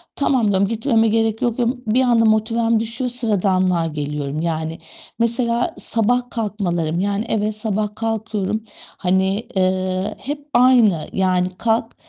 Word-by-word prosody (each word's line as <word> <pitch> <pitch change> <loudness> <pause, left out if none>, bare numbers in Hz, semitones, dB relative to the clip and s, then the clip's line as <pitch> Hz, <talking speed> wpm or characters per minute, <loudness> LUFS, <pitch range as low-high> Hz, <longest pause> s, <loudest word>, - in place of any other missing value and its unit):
tamam 260 -5 +1
diyorum, 200 -1 +2
gitmeme 225 0 +1
gerek 225 0 +1
yok, 240 -1 0
diyorum. 245 +1 -1
Bir 245 +4 +3
anda 235 -3 +3
motivem 225 +1 +2
düşüyor. 235 +3 -1
Sıradanlığa 185 -7 +1
geliyorum 150 -1 -4
yani. 160 -1 -3 0.4
Mesela 235 +1 +1
sabah 245 +2 +1
kalkmalarım, 175 -7 -2
yani, 200 +3 -1
evet, 215 0 0
sabah 210 -1 -2
kalkıyorum, 220 -2 -2 0.3
hani, 190 +3 0
eee, 185 0 0
hep 290 +1 -6
aynı. 240 -9 +4
Yani 185 -1 +1
kalk, 225 0 0
215 Hz, 130 wpm, -20 LUFS, 185-230 Hz, 0.4 s, aynı